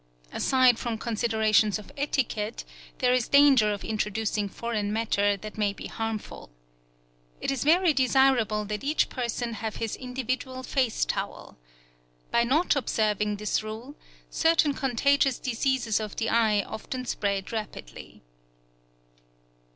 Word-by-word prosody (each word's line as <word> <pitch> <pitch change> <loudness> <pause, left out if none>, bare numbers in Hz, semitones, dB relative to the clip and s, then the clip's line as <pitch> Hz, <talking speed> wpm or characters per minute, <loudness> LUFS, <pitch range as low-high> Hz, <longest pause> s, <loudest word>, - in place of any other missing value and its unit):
Aside 255 -3 +3
from 235 -2 -3
considerations 220 -2 +1
of 210 - -12
etiquette, 245 -6 -2 0.3
there 250 -2 +2
is 250 -2 +1
danger 275 -7 +5
of 205 - -5
introducing 210 -1 -1
foreign 215 -2 -3
matter 205 -2 +1
that 215 +2 -9
may 205 -1 +1
be - - -9
harmful. 225 - -5 0.9
It - - -1
is 270 - -2
very 335 +3 +4
desirable 255 -5 +3
that 210 +3 -4
each 295 +3 +1
person 240 -1 -3
have 220 -1 -5
his 225 -2 -3
individual 255 0 -4
face 255 -4 0
towel. - - -5 0.8
By 235 - +3
not 305 +8 +2
observing 210 -5 0
this 210 +1 -1
rule, 220 +6 -7 0.4
certain 325 -3 +3
contagious 270 +1 +2
diseases 250 -2 0
of 215 -2 -5
the 225 - -1
eye 215 -3 +3
often 255 +5 -6
spread 200 -4 -2
rapidly. 210 - -7
230 Hz, 130 wpm, -27 LUFS, 215-260 Hz, 0.9 s, danger